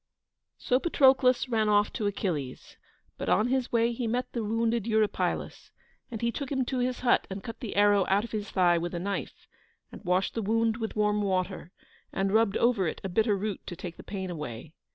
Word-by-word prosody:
So 250 - +1
Patroclus 265 -5 +4
ran 220 -3 +1
off 205 0 +3
to 210 - -1
Achilles; 160 -10 -4 0.4
but, - - -3
on 215 +5 +3
his 260 -1 0
way, 235 0 +2
he 235 0 -3
met 245 +3 -2
the 235 - -2
wounded 225 +1 0
Eurypylus, 220 -2 -1 0.4
and 225 -1 -6
he 235 - +2
took 280 +2 -5
him 265 -2 0
to 255 0 -2
his 250 0 -1
hut 245 -1 +3
and 195 0 -6
cut 230 -1 -7
the 230 - -6
arrow 205 -1 +4
out 200 +2 +3
of 235 - -8
his 210 -1 -4
thigh 175 -2 +3
with 175 +1 -4
a - - -2
knife, 200 +3 -4 0.5
and - - -11
washed 180 +1 +1
the 225 - -2
wound 225 +2 +1
with 225 -1 -4
warm 210 0 +1
water, 185 -3 -2 0.4
and 195 0 -1
rubbed 220 -2 +3
over 230 -7 +2
it - - -4
a 195 - -3
bitter 210 +2 +2
root 205 0 -3
to 175 - -5
take 170 0 -8
the - - -9
pain 190 -2 -5
away. 150 -2 -7
210 Hz, 210 wpm, -28 LUFS, 190-235 Hz, 0.5 s, Patroclus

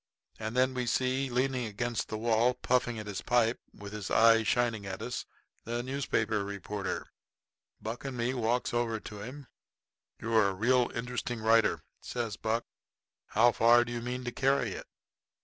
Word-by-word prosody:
And 110 +2 -4
then 130 +1 +3
we 125 -1 -2
see 130 +2 +1
leaning 125 -1 0
against 115 +2 -2
the 110 - -4
wall, 115 +2 +2
puffing 125 -2 +1
at 105 - -5
his 105 -2 -4
pipe, 120 -1 +2
with 100 0 -10
his 105 -2 -5
eye 115 0 +6
shining 115 -1 +1
at 95 -1 -5
us, 120 +3 -4 0.4
this 120 +1 -3
newspaper 130 -6 0
reporter. 100 0 -4 0.7
Buck 115 +3 -5
and 135 -2 -5
me 120 +2 0
walks 120 0 0
over 120 -2 0
to 105 -1 -9
him. 130 +6 -8 0.7
"You're 110 -2 +3
a 95 - -4
real 120 +4 +3
interesting 125 0 -3
writer," 110 +1 +3 0.2
says 115 -4 -3
Buck. 115 +2 -1 0.6
"How 120 +3 +5
far 120 +1 +5
do 120 - -6
you 120 0 -3
mean 125 +1 -4
to 120 - -3
carry 130 -2 +1
it? - - -7
120 Hz, 165 wpm, -30 LUFS, 110-125 Hz, 0.7 s, eye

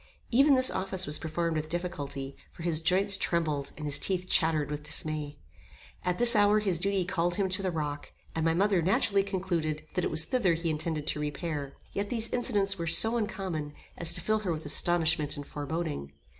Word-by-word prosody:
Even 275 +4 +5
this 260 0 +5
office 190 -1 -1
was 150 - -1
performed 165 +1 -2
with 155 0 -3
difficulty, 145 -6 -5 0.2
for 165 - -11
his 165 -2 0
joints 190 +4 +3
trembled, 155 -6 -1
and 150 - -6
his 145 -1 +2
teeth 185 -1 -1
chattered 155 -4 +1
with 150 0 -4
dismay. 150 -1 -4 0.7
At 180 0 -1
this 240 -1 +7
hour 205 0 +4
his 195 -6 +1
duty 195 0 0
called 175 -1 -1
him 195 -1 0
to 185 +2 +4
the 190 - -1
rock, 150 -4 -4 0.2
and 160 - -2
my 165 0 +2
mother 195 0 +2
naturally 195 +3 +2
concluded 175 -6 -3
that 180 - -1
it - - 0
was 155 0 +5
thither 195 -8 +1
he 165 0 -2
intended 155 -1 -3
to 150 - +1
repair. 150 -1 -4 0.2
Yet 200 +1 -3
these 230 -2 -2
incidents 200 -5 0
were 165 - -3
so 225 +8 +5
uncommon, 190 -9 -3 0.2
as 170 -1 +1
to 180 - -3
fill 215 +4 +1
her 195 -4 -3
with 155 -1 -4
astonishment 160 -1 +2
and 145 - -7
foreboding. 145 - -5
170 Hz, 200 wpm, -29 LUFS, 155-195 Hz, 0.7 s, this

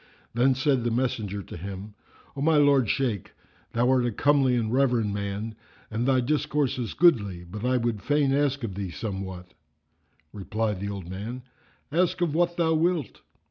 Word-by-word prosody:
Then 130 +3 +3
said 135 -2 +1
the 120 - +1
messenger 110 -5 -1
to - - -10
him, 100 +4 -7 0.4
"O 140 - -5
my 160 +1 +4
lord 140 -6 +4
Shaykh, 120 - -1 0.4
thou 120 +1 +2
art 130 -2 +3
a 120 - 0
comely 135 +1 +3
and 115 -1 -1
reverend 125 -6 +2
man, 100 +2 -3 0.4
and 115 +3 -1
thy 130 -1 +4
discourse 145 0 0
is 120 - -4
goodly; 105 - +3
but 100 +5 -8
I 125 0 +2
would 115 -4 -1
fain 145 -2 +2
ask 140 -1 +1
thee 100 -4 -4
of 85 - -10
somewhat." 95 -4 -5 0.8
Replied 105 0 -2
the 100 +1 -3
old 100 -4 -6
man, 110 +7 -6 0.5
"Ask 180 +3 +1
of 170 -4 +1
what 175 +1 +1
thou 165 -2 +2
wilt!" 160 - 0
120 Hz, 175 wpm, -26 LUFS, 100-140 Hz, 0.8 s, my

